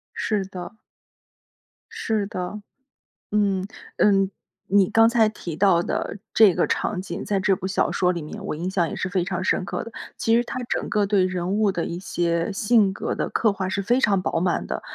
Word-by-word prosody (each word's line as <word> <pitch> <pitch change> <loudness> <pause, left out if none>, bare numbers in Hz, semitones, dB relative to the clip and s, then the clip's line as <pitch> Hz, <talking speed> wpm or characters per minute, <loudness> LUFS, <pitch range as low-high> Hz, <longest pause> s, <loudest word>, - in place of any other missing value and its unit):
是 210 -3 0
的。 185 +2 -8 1.2
是 215 -2 -1
的， 185 +2 -5 0.7
嗯， 200 -3 +1 0.3
呃。 - - +4 0.7
你 200 -2 +5
刚 225 0 +5
才 230 -2 +4
提 175 -7 -6
到 185 -3 +4
的 205 - -3
这 210 -5 +6
个 - - +2
场 185 -3 -1
景， - - -6
在 200 -2 0
这 190 -1 +2
部 185 - -5
小 190 - +1
说 180 0 +2
里 170 - -4
面， 195 +7 -8
我 - - -2
印 175 +5 -3
象 175 -3 +1
也 - - -5
是 185 - -2
非 180 -1 0
常 185 0 -3
深 185 - +1
刻 - - -4
的。 230 - -8 0.3
其 225 0 +2
实 240 - +2
它 255 +1 -5
整 - - -2
个 210 -1 +1
对 195 -2 +3
人 185 +1 -2
物 210 -2 +3
的 170 - -2
一 170 - -4
些 170 0 -1
性 205 -2 +3
格 - - -3
的 - - -1
刻 220 -3 +2
画 190 -1 -3
是 200 +1 -1
非 240 +6 +2
常 200 -7 +2
饱 165 - -1
满 175 +1 0
的。 - - -3
195 Hz, 220 characters per minute, -24 LUFS, 180-210 Hz, 1.2 s, 这